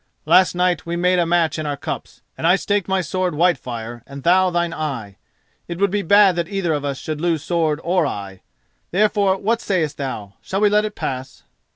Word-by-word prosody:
Last 185 Hz, -1 st, +4 dB
night 180 Hz, -1 st, +1 dB
we 170 Hz, 0 st, -4 dB
made 180 Hz, +1 st, +2 dB
a 170 Hz, -, +1 dB
match 165 Hz, -3 st, +1 dB
in 155 Hz, -, -3 dB
our 145 Hz, -1 st, -2 dB
cups, -, -, -7 dB
and 165 Hz, -, -1 dB
I 180 Hz, -, +6 dB
staked 200 Hz, 0 st, -1 dB
my 190 Hz, -1 st, +1 dB
sword 180 Hz, 0 st, -2 dB
Whitefire 120 Hz, -9 st, -1 dB
and 140 Hz, -1 st, -9 dB
thou 185 Hz, +2 st, +4 dB
thine 175 Hz, -1 st, -1 dB
eye. 120 Hz, -12 st, -5 dB, 0.5 s
It 170 Hz, -, -5 dB
would 200 Hz, 0 st, +1 dB
be 205 Hz, 0 st, 0 dB
bad 200 Hz, 0 st, +5 dB
that 170 Hz, -1 st, -1 dB
either 195 Hz, -5 st, -1 dB
of 145 Hz, -1 st, -2 dB
us 140 Hz, -2 st, -2 dB
should 155 Hz, +1 st, -5 dB
lose 165 Hz, -3 st, 0 dB
sword 160 Hz, -3 st, 0 dB
or 175 Hz, -3 st, +2 dB
eye; 100 Hz, -5 st, -6 dB, 0.5 s
therefore, 200 Hz, 0 st, +2 dB
what 225 Hz, +4 st, 0 dB
sayest 160 Hz, -7 st, -1 dB
thou, 110 Hz, -8 st, -5 dB
shall 195 Hz, +2 st, -3 dB
we 210 Hz, -, +5 dB
let 210 Hz, +1 st, +3 dB
it 210 Hz, -, -5 dB
pass?" 130 Hz, 0 st, -5 dB
170 Hz, 210 wpm, -20 LUFS, 145-190 Hz, 0.5 s, I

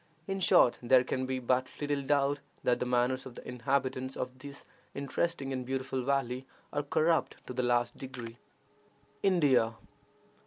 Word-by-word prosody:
In 195 Hz, +2 st, -2 dB
short, 125 Hz, -9 st, +5 dB
there 125 Hz, +1 st, +5 dB
can 130 Hz, 0 st, -2 dB
be 130 Hz, 0 st, -1 dB
but 130 Hz, +1 st, +1 dB
little 145 Hz, -1 st, 0 dB
doubt 140 Hz, 0 st, +2 dB, 0.2 s
that 125 Hz, -, +2 dB
the 125 Hz, -, -1 dB
manners 125 Hz, +1 st, +1 dB
of 125 Hz, -, -11 dB
the -, -, -10 dB
inhabitants 130 Hz, +1 st, -1 dB
of 130 Hz, 0 st, -4 dB
this 140 Hz, +1 st, -9 dB, 0.3 s
interesting 140 Hz, 0 st, -2 dB
and 130 Hz, -1 st, -2 dB
beautiful 130 Hz, +1 st, -2 dB
valley 130 Hz, -1 st, -1 dB, 0.3 s
are 145 Hz, -, +1 dB
corrupt 160 Hz, +3 st, +1 dB
to -, -, -6 dB
the 125 Hz, -, 0 dB
last 120 Hz, -1 st, +1 dB
degree. 125 Hz, -3 st, -8 dB, 0.8 s
INDIA. 135 Hz, -, +3 dB
130 Hz, 155 wpm, -31 LUFS, 125-140 Hz, 0.8 s, short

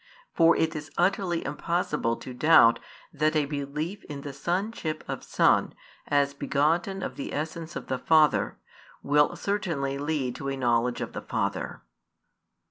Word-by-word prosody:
For 165 Hz, 0 st, +5 dB
it 160 Hz, 0 st, 0 dB
is 155 Hz, 0 st, -6 dB
utterly 180 Hz, -1 st, +1 dB
impossible 150 Hz, -5 st, -1 dB
to 125 Hz, -, -9 dB
doubt 125 Hz, -3 st, +6 dB, 0.3 s
that 155 Hz, +1 st, +1 dB
a 150 Hz, -2 st, +3 dB
belief 150 Hz, +6 st, -4 dB
in 145 Hz, -1 st, -7 dB
the 140 Hz, 0 st, -7 dB
sonship 175 Hz, +1 st, -2 dB
of -, -, -5 dB
Son, -, -, +2 dB, 0.3 s
as 140 Hz, -1 st, +2 dB
begotten 165 Hz, +7 st, 0 dB
of -, -, -5 dB
the 140 Hz, -, -5 dB
essence 160 Hz, +2 st, -4 dB
of -, -, -5 dB
the 130 Hz, -, -2 dB
Father, 155 Hz, +1 st, +3 dB, 0.5 s
will 145 Hz, +1 st, +3 dB
certainly 160 Hz, -9 st, -2 dB
lead 145 Hz, -4 st, -1 dB
to 135 Hz, -, -4 dB
a 135 Hz, -, -3 dB
knowledge 120 Hz, -1 st, +1 dB
of -, -, -5 dB
the -, -, -5 dB
Father. -, -, -3 dB
150 Hz, 150 wpm, -27 LUFS, 140-165 Hz, 0.5 s, doubt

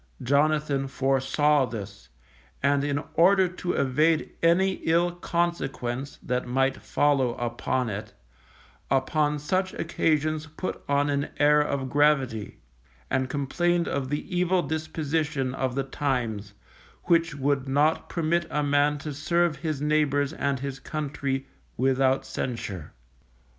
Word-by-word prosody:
Jonathan 145 Hz, 0 st, +2 dB
foresaw 135 Hz, +2 st, +2 dB
this, 100 Hz, -, -8 dB, 0.5 s
and 140 Hz, 0 st, +3 dB
in 145 Hz, +1 st, -1 dB
order 190 Hz, +2 st, +5 dB
to 180 Hz, 0 st, -3 dB
evade 155 Hz, +4 st, +2 dB
any 185 Hz, +3 st, +3 dB
ill 170 Hz, +2 st, +3 dB
consequence 170 Hz, -7 st, -2 dB
that 125 Hz, 0 st, -2 dB
might 135 Hz, +2 st, +1 dB
follow 135 Hz, -5 st, +1 dB
upon 120 Hz, +1 st, -1 dB
it, 105 Hz, 0 st, -5 dB, 0.8 s
upon 145 Hz, +3 st, +1 dB
such 185 Hz, +6 st, -1 dB
occasions 155 Hz, -2 st, 0 dB
put 160 Hz, +4 st, -5 dB
on 140 Hz, 0 st, +2 dB
an 140 Hz, 0 st, -1 dB
air 150 Hz, 0 st, +5 dB
of 140 Hz, -2 st, -1 dB
gravity, 135 Hz, -6 st, +1 dB, 0.5 s
and 130 Hz, 0 st, +1 dB
complained 170 Hz, +5 st, 0 dB
of 135 Hz, -2 st, -2 dB
the 145 Hz, +1 st, -2 dB
evil 180 Hz, 0 st, +2 dB
disposition 155 Hz, -3 st, -2 dB
of 130 Hz, -1 st, -2 dB
the 135 Hz, -, 0 dB
times, 120 Hz, -7 st, -2 dB, 0.5 s
which 170 Hz, -2 st, +2 dB
would 140 Hz, -1 st, 0 dB
not 150 Hz, +4 st, +2 dB
permit 170 Hz, 0 st, 0 dB
a 150 Hz, -1 st, 0 dB
man 145 Hz, +1 st, +2 dB
to 145 Hz, +1 st, -6 dB
serve 170 Hz, +3 st, +1 dB
his 155 Hz, -4 st, -3 dB
neighbours 150 Hz, -1 st, +1 dB
and 140 Hz, -4 st, -1 dB
his 135 Hz, -1 st, -4 dB
country 140 Hz, -2 st, -3 dB, 0.3 s
without 130 Hz, +1 st, +2 dB
censure. 100 Hz, -, -5 dB
145 Hz, 125 wpm, -26 LUFS, 135-155 Hz, 0.8 s, order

